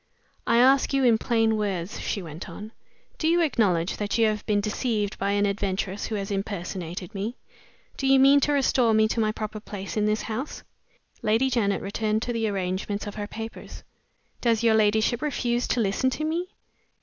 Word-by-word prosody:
"I 235 - +4
ask 265 +3 +4
you 275 -1 +2
in 230 -3 +4
plain 225 -2 +2
words," 195 -3 -3
she 200 - -3
went 160 +1 -8
on, 215 +1 -9 0.5
"do 315 - 0
you 340 +2 +4
acknowledge 195 - +1
that 205 +1 -1
you 230 - +4
have 215 -1 0
been 210 -2 +2
deceived 210 0 -2
by 200 +1 0
an 205 0 +2
adventuress 200 -1 -2
who 220 - -3
has 200 0 -3
personated 180 -1 -6
me? 215 +5 -4 0.6
Do 270 - -1
you 270 0 +6
mean 275 +2 +7
to 295 - +1
restore 255 -5 +3
me 220 0 +4
to 230 - -1
my 215 -1 +2
proper 215 0 -5
place 200 -2 -7
in 210 - +2
this 215 0 0
house?" 240 +6 -5 0.6
Lady 225 +5 +2
Janet 205 -5 +1
returned 215 +2 -1
to 240 - -2
the 225 -1 0
arrangement 195 +1 -2
of 205 - -6
her 205 -1 -5
papers. 225 +1 -8 0.6
"Does 230 -2 +2
your 230 -1 +5
ladyship 220 +3 +2
refuse 245 -5 -1
to - - 0
listen 215 +4 +1
to 310 - -3
me?" 330 +3 -1
215 Hz, 190 wpm, -25 LUFS, 200-240 Hz, 0.6 s, mean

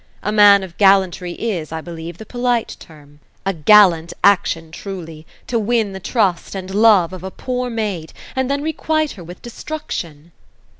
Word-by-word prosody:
A 210 - -1
man 205 -2 +6
of 180 -3 -11
gallantry 190 -3 +3
is, 180 -10 -4
I 160 - -4
believe, 165 0 -8
the 220 - -10
polite 245 0 -1
term. 145 -2 -16 0.3
A 195 - 0
gallant 170 -1 +5
action, 180 -5 +2
truly, 165 -4 -8 0.2
to 235 - -1
win 220 -2 0
the 190 - -6
trust 190 -2 -1
and 190 0 -6
love 205 -5 +4
of 185 -1 -8
a 190 - -4
poor 250 +4 -4
maid, 210 -8 -3 0.2
and 260 0 -1
then 280 +1 -1
requite 310 0 -1
her 185 - -10
with 175 +2 -12
destruction." 175 - -7
195 Hz, 165 wpm, -19 LUFS, 170-225 Hz, 0.3 s, man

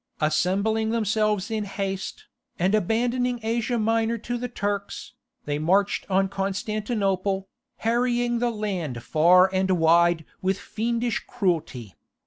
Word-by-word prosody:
Assembling 200 +8 +1
themselves 215 -2 0
in 215 -1 -1
haste, 195 - -4 0.3
and 185 +3 +1
abandoning 240 +4 +1
Asia 235 +2 0
Minor 225 +1 +1
to 240 +2 -4
the 250 - -3
Turks, 205 -3 -4 0.3
they 145 0 -2
marched 190 +6 +1
on 195 0 +2
Constantinople, 195 -1 -2 0.3
harrying 240 +1 +1
the 240 0 +1
land 185 - -3
far 175 +6 +5
and 190 0 +1
wide 170 -1 +3 0.2
with 190 0 0
fiendish 235 +2 -2
cruelty. 165 - -2
205 Hz, 115 wpm, -25 LUFS, 185-230 Hz, 0.3 s, far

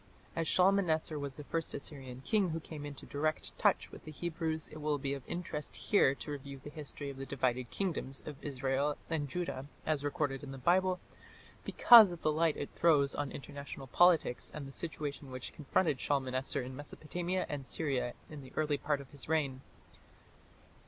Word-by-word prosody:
As 165 -1 0
Shalmaneser 180 -5 +3
was 140 -2 -4
the 150 - -8
first 165 +2 -2
Assyrian 130 -3 -7
king 200 +3 +2
who 165 0 -2
came 150 -2 -7
into 145 -2 -8
direct 155 +2 -1
touch - - +3
with - - -11
the - - -9
Hebrews, 160 0 -2
it 155 - -9
will 150 -1 +1
be 140 0 -2
of 140 - -4
interest 170 -4 -4
here 140 -10 +4
to 150 - -7
review 140 -1 -6
the 145 +2 -10
history 145 -1 -6
of 135 - -11
the 135 - -5
divided 125 -2 0
kingdoms 160 -8 -2
of 150 - -5
Israel 140 +1 0
and 145 -3 0
Judah, 145 -5 -3 0.2
as 155 -2 +1
recorded 145 -2 -1
in 140 - -6
the 135 - -6
Bible, 180 +6 +3 0.6
because 225 -6 +9
of 175 - -8
the 155 - +3
light 160 0 +2
it 145 - -4
throws 145 -5 +4
on 140 - -2
international 140 -1 -7
politics 165 -3 +4
and 145 -2 -6
the - - -9
situation 145 -3 -4
which 130 -1 -6
confronted 150 -1 +1
Shalmaneser 130 -2 0
in 130 +1 -7
Mesopotamia 175 +6 -3
and 145 -2 -4
Syria 135 -3 -1
in 150 -2 -8
the 130 -1 -12
early 150 -2 +1
part 145 -1 0
of 135 - -14
his 145 0 -9
reign. 140 -5 +1
145 Hz, 185 wpm, -33 LUFS, 135-160 Hz, 0.6 s, because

